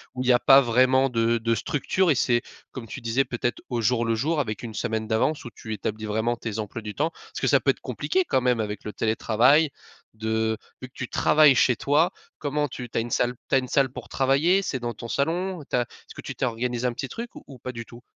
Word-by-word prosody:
Ou 130 - -2
il - - -3
y 125 - +6
a 120 - +4
pas 135 +2 +7
vraiment 130 +2 +3
de 115 0 +1
de 115 0 0
structure 160 - 0
et 145 - +3
c'est, 120 0 +2 0.3
comme 120 -4 -8
tu - - -7
disais, 115 +4 +1
peut-être 120 0 -3
au 120 - -1
jour 120 +1 +2
le 115 0 +1
jour, 150 +7 0
avec 110 -5 -3
une 115 -2 -6
semaine 110 +1 -2
d'avance 120 +7 0
où - - -5
tu 110 - -8
établis 110 +1 -4
vraiment 110 +3 0
tes 115 -2 -5
emplois 110 +2 -5
du 105 -1 -6
temps? 160 +3 0
Parce - - -11
que - - +1
ça - - +5
peut - - +4
être - - -10
compliqué 375 0 -1
quand 130 - +2
même 125 -2 +2
avec 105 -2 -3
le 105 - -5
télétravail 120 +7 +3 0.4
de, 110 0 -1 0.2
vu 130 - -6
que - - -29
tu 130 - -4
travailles 150 -2 +5
chez 125 0 +3
toi 150 +8 +2 0.3
comment 150 0 -1
tu 125 -2 -7
tu - - -5
as - - +3
une 120 +1 -6
salle 125 +2 +1
tu - - +3
as - - +6
une 130 - -5
salle 135 0 +2
pour - - -9
travailler? 140 +7 +3
C'est 130 - -2
dans 120 -1 -3
ton 115 - -8
salon? 170 +6 -1
Tu - - -1
as 125 - +3
est-ce 120 - -10
que - - -8
tu - - -6
t'es - - -1
organisé 120 +1 -1
un 120 - -1
petit 135 - -4
truc 235 - -7
ou - - -11
ou 135 -4 -12
pas 130 - -5
du 115 -1 -7
tout? 120 +1 -13
125 Hz, 265 wpm, -25 LUFS, 115-135 Hz, 0.4 s, pas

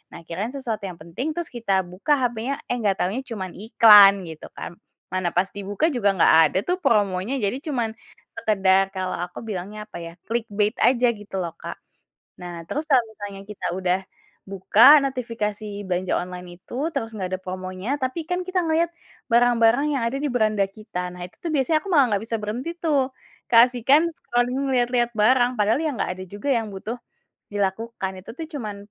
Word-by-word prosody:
Nah, 170 - -10
kirain 200 +8 -3
sesuatu 230 -6 -4
yang 180 - -7
penting, 210 - -4
terus 345 -2 -4
kita 200 -6 0
buka 185 - -1
hapenya, 240 +3 -1 0.2
eh, 245 - 0
nggak 200 -3 +1
tahunya 210 +9 -1
cuman 190 -5 -5
iklan 205 -2 +7
gitu 160 -1 -9
kan. - - -6 0.4
Mana 185 -1 -1
pas 190 +2 +2
dibuka 205 +9 -1
juga 200 -5 +2
nggak - - +5 0.2
ada - - -1
tuh 360 +1 +1
promonya 210 - +1
jadi 205 +5 0
cuman 240 -6 -1 0.4
sekedar 195 -3 +2
kalau 185 -1 -2
aku 175 - -10
bilangnya 210 +1 -6
apa 210 - -9
ya, 165 0 -8
clickbait 215 -2 -1
aja 245 -1 +4
gitu 205 -2 -10
loh, 170 -3 -3
Kak. - - -8 0.6
Nah 175 -1 -7
terus 300 +2 -2
kalau 260 -3 +6
misalnya 205 -2 -8
kita 190 -4 -4
udah 185 0 +1 0.5
buka 220 +9 +6
notifikasi 230 -6 -3 0.2
belanja 180 +1 -1
online 180 0 -9
itu, - - -14 0.2
terus 225 0 -3
nggak 185 -2 -3
ada 185 - -2
promonya 185 +3 -6
tapi 290 +5 -4
kan 360 0 -1
kita 370 -1 +1
ngelihat 330 +1 +1 0.4
barang-barang 240 +3 +4
yang 245 - -2
ada 255 +4 -1
di 295 - -1
beranda 215 -4 +2
kita. 185 -3 -6
Nah 180 - -10
itu 180 - -14
tuh 335 - -2
biasanya 285 +4 +2
aku 395 - -9
malah 290 -7 +5
nggak 200 +2 0
bisa 225 - 0
berhenti 240 +10 -4
tuh, 285 -6 +1 0.4
keasikan 245 +5 +5
scrolling 245 0 -1
ngelihat-lihat 245 -2 +1
barang. 245 +3 +4
Padahal 215 +6 +2
ya 315 - 0
nggak 190 - -1
ada 185 - -5
juga 205 +8 -5
yang 225 -3 -1
butuh 205 +5 -6 0.6
dilakukan 200 0 -2
itu - - -9
tuh 320 +5 -7
cuman, 215 -7 -4
215 Hz, 180 wpm, -23 LUFS, 190-250 Hz, 0.6 s, iklan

